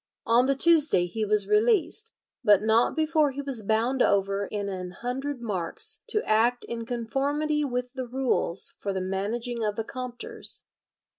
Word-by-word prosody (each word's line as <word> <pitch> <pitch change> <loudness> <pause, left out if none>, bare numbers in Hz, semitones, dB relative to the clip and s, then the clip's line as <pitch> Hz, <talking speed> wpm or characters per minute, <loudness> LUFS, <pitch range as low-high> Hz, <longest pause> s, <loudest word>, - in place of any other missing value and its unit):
On 240 +3 +3
the 275 - +2
Tuesday 300 - +4
he 215 +5 -4
was 210 0 +3
released, 435 0 +2 0.3
but 205 -1 +5
not 225 +2 +2
before 310 -1 +2
he 280 - -4
was 270 -5 -1
bound 225 +5 0
over 200 0 +1
in 205 -1 -4
an 185 -2 -5
hundred 250 +6 -5
marks 230 - -1
to 425 - 0
act 235 +3 +2
in 230 -1 -6
conformity 280 +6 -1
with 250 -2 -3
the 260 -2 -5
rules 245 -8 +1
for 200 - -3
the 190 - -2
managing 220 +6 -3
of 210 -1 -1
the 225 - -2
Compters. 250 0 -6
240 Hz, 160 wpm, -26 LUFS, 210-280 Hz, 0.3 s, but